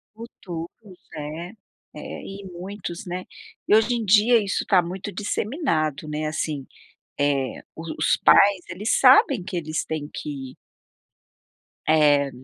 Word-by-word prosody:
Futuros, 180 -7 -7 0.5
né. 155 +4 -6 0.4
É, - - -8 0.2
e 195 +1 -9
muitos, 180 0 -7
né. 180 +1 -4 0.4
E - - +5
hoje 220 +3 +4
em 230 -2 -2
dia 215 +3 +5
isso 200 - -1
tá 190 - +5
muito 185 +3 -6
disseminado, 180 - -2
né, 150 0 -3
assim, 155 -3 -3 0.5
eh, 140 -2 0
os 165 +1 -8
os - - +3
pais, 200 -1 +6
eles 195 +6 0
sabem 260 -4 +6
que 180 0 -5
eles 155 -1 -2
têm 155 -2 -4
que 135 -3 -6 1.3
eh, 145 -3 +4
175 Hz, 130 wpm, -24 LUFS, 155-205 Hz, 1.3 s, pais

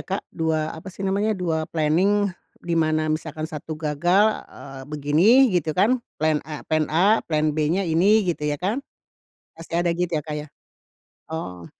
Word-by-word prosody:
Kak, 195 +1 -4
2, 160 -1 -1
apa 160 +4 -9
sih 190 +1 -7
namanya, 200 +2 0
2 160 -3 -2
planning 185 +6 +2 0.3
di 170 - -2
mana 155 -1 +1
misalkan 155 0 -4
1 155 0 -6
gagal, 165 +6 +2 0.2
eee, 135 -1 -10
begini 165 - +4
gitu 160 -3 0
kan 230 +7 +3 0.2
plan 155 -1 +1
A 150 -1 -7
plan 155 -1 0
A, 195 +8 +3
plan 155 -1 0
B-nya 155 +6 0
ini 190 +6 +3
gitu 160 -4 -1
ya 145 - 0
kan. 200 - -2 0.8
Pasti 165 +1 -3
ada 175 - +1
gitu 180 0 -1
ya, - - -10
Kak, 155 -1 -5
ya? 150 0 -5 0.8
Oh. 90 - -6
160 Hz, 170 wpm, -23 LUFS, 155-190 Hz, 0.8 s, begini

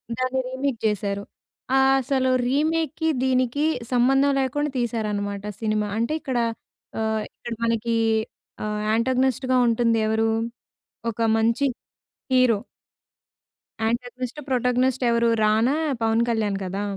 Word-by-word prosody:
దాన్ని 255 +1 -1
రీమేక్ 260 -1 -2
జేసారు. 200 -1 -1 0.5
ఆహ్, 270 0 +5
అసలు 260 0 +1 0.2
రీమేక్‌కి, 315 +3 0 0.2
దీనికి 255 +2 +1 0.3
సంబంధం 270 +3 +4
లేకుండా 290 +3 0
తీశారన్నమాట 210 -4 -2 0.2
సినిమా. 215 -1 0
అంటే, 235 +6 0
ఇక్కడ 260 -3 -2 0.6
ఆహ్, 220 -1 0
ఇక్కడ 240 - -6
మనకి 230 0 0 0.7
ఆహ్, 210 0 -2
యాంటాగనిస్ట్‌గా 255 +2 +1
ఉంటుంది 230 -1 +2
ఎవరు? 220 +1 +1 0.8
ఒక 230 - -9 0.2
మంచి 230 +5 +2 0.7
హీరో... 255 -4 +4 1.3
యాంటాగనిస్ట్, 245 +3 -3
ప్రోటాగోనిస్ట్ 255 0 +1
ఎవరు 235 0 +3 0.2
రానా, 220 +6 +3 0.3
పవన్ 225 +1 +2
కళ్యాణ్ 215 -4 0
కదా 195 +2 -3
240 Hz, 105 wpm, -24 LUFS, 220-260 Hz, 1.3 s, ఆహ్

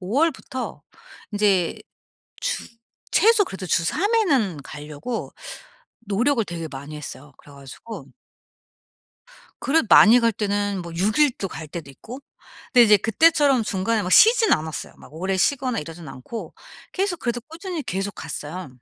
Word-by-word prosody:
5 190 +5 -5
월부터 285 -5 -2 0.5
인제 200 -4 +1 0.6
주 - - -2 0.4
최소 440 -1 +5
그래도 190 -1 -7
주 170 - +2
3 405 - 0
회는 250 - +1
가려고 150 - -6 0.7
노력을 230 +4 0
되게 170 -3 -6
많이 140 +2 -8
했어요. 145 -1 -9
그래 145 - -17
가지고 140 - -10 1.6
그래도 300 -2 +2
많이 235 +3 +8
갈 230 -1 +2
때는 205 -2 -1
뭐 170 -1 -9
6 210 - +1
일도 255 -10 +2
갈 160 - -8
때도 165 -3 -7
있고 240 - -10 0.5
근데 245 -2 +7
이제 210 -1 +6
그때처럼 275 +3 +3
중간에 210 +2 -1
막 180 - -4
쉬지는 455 0 +6
않았어요. 155 -1 -5
막 145 - -16
오래 190 +4 -2
쉬거나 255 +4 +1
이러진 165 +1 -8
않고 135 - -8 0.4
계속 380 -3 -1
그래도 240 0 -2
꾸준히 330 - -6
계속 195 +2 -3
갔어요. 165 +2 -6
205 Hz, 290 characters per minute, -23 LUFS, 170-270 Hz, 1.6 s, 많이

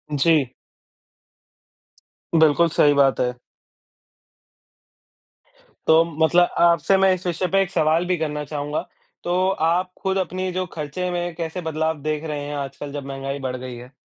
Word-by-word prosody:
जी। 145 -2 +3 1.9
बिल्कुल, 160 +1 +5
सही 145 -1 +4
बात 140 -2 +3
है। 125 0 +1 2.5
तो 160 +1 +6 0.2
मतलब 175 +2 +4
आपसे 170 +2 +4
मैं 190 0 +4
इस 185 0 -6
विषय 175 +1 -1
पे 195 0 +4
1 190 -1 -2
सवाल 160 -1 +2
भी 180 0 0
करना 150 -2 -3
चाहूँगा। 145 0 -4 0.4
तो 180 +2 +1 0.2
आप 180 +2 0
खुद 190 0 0
अपनी 185 0 -2
जो 185 +1 -2
खर्चे 160 +4 -4
में 175 0 -2
कैसे 165 +1 -4
बदलाव 160 -1 -2
देख 155 +1 -2
रहे 150 -2 -4
हैं 145 0 -5
आजकल 140 0 -6
जब 140 -1 -6
महँगाई 135 0 -5
बढ़ 130 -2 -3
गयी 130 -1 -7
है? 125 +2 -12
160 Hz, 150 wpm, -22 LUFS, 145-175 Hz, 2.5 s, तो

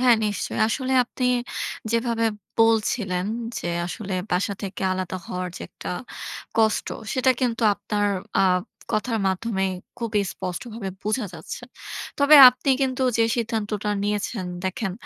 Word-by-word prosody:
হ্যাঁ 250 -2 +6
নিশ্চয়ই। 205 -1 -2
আসলে 260 +3 -1
আপনি 250 +1 -4 0.7
যেভাবে 230 -1 +1 0.3
বলছিলেন 215 -4 +2 0.3
যে - - -4 0.2
আসলে 190 +1 -4 0.2
বাসা 185 +3 +1
থেকে 195 0 -5
আলাদা 185 0 -3
হওয়ার 180 0 -3
যে - - -7
একটা - - -7 0.7
কষ্ট। 220 -1 +3 0.2
সেটা 260 0 +3
কিন্তু 240 -2 0
আপনার 205 0 -2 0.4
আ - - +5 0.5
কথার 225 +1 0
মাধ্যমেই 190 -1 -1 0.3
খুবই 225 -3 0
স্পষ্টভাবে 210 +3 -5
বুঝা 215 +2 -1
যাচ্ছে। - - -7 0.6
তবে 285 +1 +8
আপনি 250 +2 0
কিন্তু 260 -1 0 0.2
যে 225 - +5
সিদ্ধান্তটা 215 -3 -1
নিয়েছেন, 205 -1 -2 0.2
দেখেন, 190 +1 -2
215 Hz, 130 wpm, -24 LUFS, 195-235 Hz, 0.7 s, তবে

